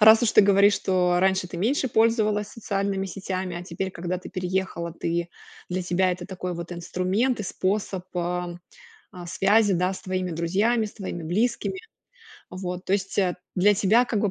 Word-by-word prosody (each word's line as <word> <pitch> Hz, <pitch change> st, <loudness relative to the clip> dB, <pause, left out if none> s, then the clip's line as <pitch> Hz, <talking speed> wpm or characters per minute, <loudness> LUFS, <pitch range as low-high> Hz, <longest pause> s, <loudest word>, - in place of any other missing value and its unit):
раз 220 Hz, +2 st, +8 dB
уж 235 Hz, -, +2 dB
ты -, -, +7 dB
говоришь, 200 Hz, +1 st, +5 dB
что 180 Hz, -2 st, +1 dB
раньше 190 Hz, -1 st, +2 dB
ты 175 Hz, -, -7 dB
меньше 255 Hz, +8 st, +1 dB
пользовалась 215 Hz, -2 st, +2 dB
социальными 200 Hz, -3 st, -2 dB
сетями, 185 Hz, -2 st, -4 dB
а 175 Hz, -, -5 dB
теперь, 190 Hz, +1 st, -4 dB
когда 180 Hz, +1 st, -3 dB
ты -, -, -10 dB
переехала, 185 Hz, -2 st, -2 dB
ты 170 Hz, 0 st, -2 dB, 0.4 s
для 185 Hz, 0 st, -1 dB
тебя 180 Hz, +1 st, +1 dB
это 180 Hz, 0 st, -7 dB
такой 185 Hz, -2 st, -5 dB
вот 170 Hz, +1 st, -6 dB
инструмент 185 Hz, +8 st, 0 dB
и -, -, -2 dB
способ, 190 Hz, -1 st, -2 dB
а, 175 Hz, 0 st, -2 dB, 0.6 s
а, 180 Hz, -2 st, -9 dB
связи, 205 Hz, +3 st, +3 dB
да, 180 Hz, +2 st, +1 dB
с -, -, -9 dB
твоими 185 Hz, -1 st, -2 dB
друзьями, 200 Hz, +8 st, +1 dB
с 205 Hz, -, -9 dB
твоими 185 Hz, -5 st, -6 dB
близкими. 235 Hz, -, 0 dB, 0.7 s
Вот. 180 Hz, 0 st, -5 dB
То 190 Hz, -, -2 dB
есть 195 Hz, 0 st, -3 dB, 0.4 s
для 205 Hz, +3 st, +4 dB
тебя 215 Hz, +6 st, +4 dB
как 225 Hz, -4 st, -1 dB
бы 205 Hz, -, +1 dB
190 Hz, 175 wpm, -25 LUFS, 180-205 Hz, 0.7 s, раз